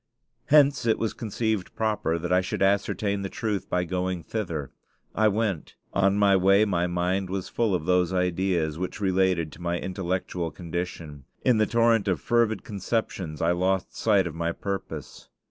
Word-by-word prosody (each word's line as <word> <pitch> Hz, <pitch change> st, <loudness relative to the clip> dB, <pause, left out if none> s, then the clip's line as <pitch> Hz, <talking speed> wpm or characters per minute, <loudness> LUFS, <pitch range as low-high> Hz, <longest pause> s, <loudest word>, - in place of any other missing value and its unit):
Hence 145 Hz, -4 st, +4 dB
it 110 Hz, -, +3 dB
was 110 Hz, -, -1 dB
conceived 110 Hz, -3 st, -2 dB
proper 105 Hz, -7 st, 0 dB
that 85 Hz, +2 st, -2 dB
I 90 Hz, -, +4 dB
should 95 Hz, -, -2 dB
ascertain 100 Hz, +1 st, +1 dB
the 95 Hz, -, -3 dB
truth 105 Hz, -3 st, -3 dB
by 90 Hz, 0 st, +1 dB
going 90 Hz, 0 st, -2 dB
thither. 85 Hz, -, -4 dB, 0.4 s
I 110 Hz, 0 st, +3 dB
went. 105 Hz, -5 st, -1 dB, 0.2 s
On 100 Hz, 0 st, +3 dB
my 100 Hz, -1 st, +5 dB
way 100 Hz, +3 st, +5 dB
my 90 Hz, -4 st, 0 dB
mind 90 Hz, +2 st, -1 dB
was 95 Hz, -1 st, -3 dB
full 115 Hz, -5 st, +1 dB
of 80 Hz, -, -3 dB
those 90 Hz, 0 st, +2 dB
ideas 90 Hz, -3 st, 0 dB
which 90 Hz, -, -4 dB
related 95 Hz, -4 st, +1 dB
to 85 Hz, -, -13 dB
my 85 Hz, 0 st, -1 dB
intellectual 90 Hz, -2 st, -3 dB
condition. 80 Hz, -4 st, -6 dB, 0.2 s
In 125 Hz, -4 st, +4 dB
the 110 Hz, -, +3 dB
torrent 115 Hz, -2 st, +3 dB
of 95 Hz, -, +1 dB
fervid 115 Hz, -3 st, +1 dB
conceptions 95 Hz, -6 st, -3 dB
I 85 Hz, -, +3 dB
lost 95 Hz, +2 st, 0 dB
sight 100 Hz, -4 st, +3 dB
of 85 Hz, -, -4 dB
my 85 Hz, +1 st, -1 dB
purpose. 100 Hz, +1 st, -6 dB
95 Hz, 170 wpm, -26 LUFS, 90-105 Hz, 0.4 s, my